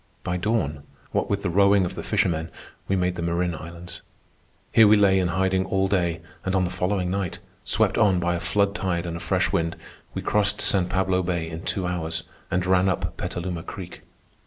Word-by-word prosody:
By 90 Hz, -, -2 dB
dawn, 90 Hz, -8 st, -1 dB, 0.3 s
what -, -, 0 dB
with 100 Hz, 0 st, -1 dB
the 95 Hz, -, 0 dB
rowing 100 Hz, +1 st, +4 dB
of 90 Hz, -, -4 dB
the -, -, -5 dB
fishermen, 90 Hz, -6 st, 0 dB, 0.4 s
we 95 Hz, -, +1 dB
made 90 Hz, -1 st, +1 dB
the -, -, -3 dB
Marin 85 Hz, +1 st, 0 dB
Islands. 85 Hz, +1 st, -9 dB, 0.7 s
Here 110 Hz, -2 st, +7 dB
we 105 Hz, +1 st, +6 dB
lay 95 Hz, -2 st, +4 dB
in 90 Hz, -, +1 dB
hiding 95 Hz, +1 st, +1 dB
all 95 Hz, 0 st, +1 dB
day, 90 Hz, -4 st, 0 dB, 0.2 s
and 95 Hz, 0 st, -1 dB
on 95 Hz, -, +3 dB
the 90 Hz, -, -2 dB
following 90 Hz, 0 st, -1 dB
night, 95 Hz, -3 st, -2 dB, 0.3 s
swept -, -, +2 dB
on 95 Hz, -4 st, +4 dB
by 85 Hz, 0 st, 0 dB
a 85 Hz, -, -1 dB
flood 100 Hz, +4 st, +1 dB
tide 90 Hz, -4 st, -1 dB
and 85 Hz, -1 st, -4 dB
a -, -, -7 dB
fresh -, -, 0 dB
wind, 80 Hz, 0 st, 0 dB, 0.4 s
we -, -, -3 dB
crossed 105 Hz, -1 st, +1 dB
San 95 Hz, -2 st, +3 dB
Pablo 95 Hz, -1 st, +1 dB
Bay 85 Hz, -2 st, -2 dB
in 80 Hz, 0 st, -6 dB
two 95 Hz, 0 st, -2 dB
hours 80 Hz, -2 st, -2 dB, 0.3 s
and 90 Hz, +1 st, 0 dB
ran 95 Hz, +1 st, +3 dB
up 90 Hz, -3 st, -2 dB
Petaluma 90 Hz, -1 st, -4 dB
Creek. 90 Hz, +1 st, -8 dB
90 Hz, 205 wpm, -25 LUFS, 85-95 Hz, 0.7 s, Here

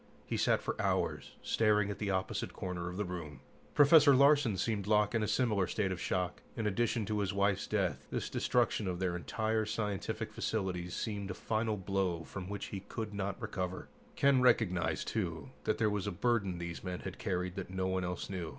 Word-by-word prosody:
He -, -, -2 dB
sat -, -, +2 dB
for -, -, -2 dB
hours, -, -, -1 dB
staring 105 Hz, -2 st, +3 dB
at -, -, -6 dB
the 105 Hz, -, -1 dB
opposite 95 Hz, -1 st, -1 dB
corner 90 Hz, -1 st, -4 dB
of 90 Hz, -, -7 dB
the 105 Hz, -, -1 dB
room. 85 Hz, -5 st, -6 dB, 0.3 s
Professor 145 Hz, -1 st, +8 dB
Larsen 140 Hz, -6 st, +5 dB
seemed 100 Hz, 0 st, -1 dB
locked 105 Hz, 0 st, +3 dB
in 115 Hz, -, +2 dB
a 105 Hz, -, 0 dB
similar 105 Hz, -4 st, +2 dB
state 100 Hz, -3 st, 0 dB
of 90 Hz, -, -4 dB
shock. 90 Hz, -1 st, -1 dB, 0.2 s
In 110 Hz, -, -1 dB
addition 110 Hz, +1 st, +1 dB
to 105 Hz, +1 st, -1 dB
his 100 Hz, -1 st, 0 dB
wife's 100 Hz, 0 st, +1 dB
death, 100 Hz, -5 st, -1 dB
this -, -, -2 dB
destruction 120 Hz, -4 st, +1 dB
of 90 Hz, -1 st, -1 dB
their 90 Hz, -1 st, -1 dB
entire 110 Hz, +5 st, 0 dB
scientific 105 Hz, -2 st, -3 dB
facilities 90 Hz, -5 st, -2 dB
seemed 100 Hz, -3 st, -3 dB
a 95 Hz, -, -4 dB
final 110 Hz, 0 st, -1 dB
blow 95 Hz, -3 st, -1 dB
from 95 Hz, +3 st, -7 dB
which 100 Hz, 0 st, -4 dB
he 100 Hz, -, -2 dB
could 105 Hz, +2 st, -6 dB
not 100 Hz, 0 st, -3 dB
recover. 90 Hz, -1 st, -4 dB, 0.3 s
Ken 140 Hz, -2 st, +4 dB
recognized, 100 Hz, -8 st, +2 dB
too, -, -, -3 dB
that -, -, +1 dB
there 110 Hz, -, +2 dB
was 105 Hz, -2 st, -1 dB
a -, -, 0 dB
burden 100 Hz, -2 st, 0 dB
these 85 Hz, -1 st, -5 dB
men 90 Hz, -1 st, -4 dB
had 95 Hz, -, -7 dB
carried 90 Hz, -3 st, -1 dB
that 95 Hz, -2 st, -5 dB
no 95 Hz, 0 st, -2 dB
one 95 Hz, 0 st, 0 dB
else 90 Hz, 0 st, -3 dB
knew. 90 Hz, -5 st, -4 dB
100 Hz, 200 wpm, -33 LUFS, 90-110 Hz, 0.3 s, Professor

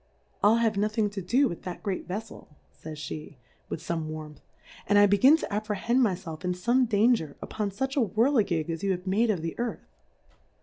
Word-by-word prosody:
I'll 210 Hz, +2 st, +6 dB
have 230 Hz, -2 st, +2 dB
notliing 210 Hz, +1 st, 0 dB
to 200 Hz, -1 st, -5 dB
do 250 Hz, +10 st, +3 dB
with 170 Hz, -, -6 dB
that 180 Hz, -1 st, -7 dB
great 195 Hz, -3 st, -3 dB
Veffel, 210 Hz, +5 st, -6 dB, 0.2 s
fays 155 Hz, -1 st, -8 dB
fie, 150 Hz, -2 st, -8 dB, 0.3 s
with -, -, -4 dB
ibme 165 Hz, -2 st, -3 dB
Warmth, 155 Hz, -1 st, -8 dB, 0.5 s
and 205 Hz, -, +4 dB
I 205 Hz, -, +8 dB
begin 255 Hz, +10 st, +6 dB
to 265 Hz, -, -5 dB
apprehend 215 Hz, +4 st, 0 dB
my 210 Hz, -7 st, +3 dB
Self 165 Hz, -2 st, -9 dB
in 180 Hz, 0 st, 0 dB
fome 240 Hz, +7 st, +1 dB
Danger 210 Hz, -, +2 dB
upon 210 Hz, -2 st, -3 dB
fuch 265 Hz, +8 st, -3 dB
a 280 Hz, -, +3 dB
Whirlegig 215 Hz, -, +2 dB
as 165 Hz, -, -4 dB
you 200 Hz, -, -1 dB
have 180 Hz, +1 st, -6 dB
made 210 Hz, +5 st, +2 dB
of 185 Hz, -7 st, 0 dB
the 165 Hz, -, -3 dB
Earth. 240 Hz, 0 st, -3 dB
205 Hz, 200 wpm, -27 LUFS, 175-225 Hz, 0.5 s, I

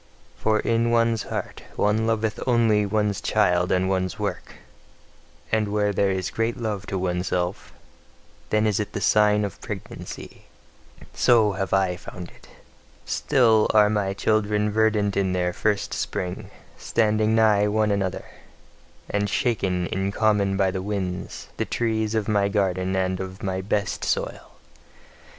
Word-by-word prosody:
For 110 Hz, 0 st, +1 dB
in 115 Hz, 0 st, +1 dB
one's 115 Hz, -1 st, +2 dB
heart -, -, -5 dB
one 110 Hz, +2 st, +1 dB
loveth 110 Hz, -1 st, 0 dB
only 115 Hz, -4 st, +3 dB
one's 105 Hz, -1 st, 0 dB
child 90 Hz, -4 st, +2 dB
and 95 Hz, 0 st, +2 dB
one's 95 Hz, -2 st, -1 dB
work; -, -, -4 dB, 1.0 s
and 110 Hz, -1 st, +1 dB
where 105 Hz, -1 st, +1 dB
there 100 Hz, 0 st, +2 dB
is 95 Hz, -1 st, -2 dB
great 115 Hz, +1 st, -1 dB
love 105 Hz, -4 st, -4 dB
to 95 Hz, -, -2 dB
oneself, 90 Hz, 0 st, -2 dB, 0.8 s
then 110 Hz, 0 st, +2 dB
is 105 Hz, -1 st, +1 dB
it 105 Hz, -, -4 dB
the -, -, -2 dB
sign 105 Hz, -1 st, +3 dB
of 100 Hz, -, -8 dB
pregnancy: -, -, -8 dB, 0.7 s
so 110 Hz, -4 st, +4 dB
have 95 Hz, -1 st, -3 dB
I 95 Hz, -2 st, +2 dB
found 90 Hz, -1 st, -9 dB
it. -, -, -19 dB, 0.6 s
Still 115 Hz, -6 st, +3 dB
are 105 Hz, -1 st, +6 dB
my 100 Hz, -2 st, -1 dB
children 105 Hz, 0 st, +1 dB
verdant 105 Hz, -2 st, +2 dB
in 95 Hz, -2 st, +1 dB
their 90 Hz, -1 st, 0 dB
first 105 Hz, +2 st, -1 dB
spring, 90 Hz, -1 st, -4 dB, 0.3 s
standing 110 Hz, -1 st, +1 dB
nigh 105 Hz, -2 st, +4 dB
one 105 Hz, 0 st, +1 dB
another, 95 Hz, -3 st, -2 dB, 0.8 s
and 105 Hz, 0 st, -1 dB
shaken 95 Hz, -6 st, 0 dB
in 95 Hz, +3 st, -2 dB
common 100 Hz, -2 st, +1 dB
by 95 Hz, -1 st, +2 dB
the 95 Hz, -, -3 dB
winds, 95 Hz, -3 st, -4 dB
the -, -, -1 dB
trees 110 Hz, -2 st, -1 dB
of 110 Hz, -2 st, 0 dB
my 100 Hz, -2 st, +2 dB
garden 95 Hz, -2 st, 0 dB
and 95 Hz, -1 st, 0 dB
of 95 Hz, 0 st, -7 dB
my 95 Hz, -1 st, -2 dB
best 100 Hz, +1 st, -2 dB
soil. -, -, -2 dB
105 Hz, 145 wpm, -24 LUFS, 95-110 Hz, 1.0 s, are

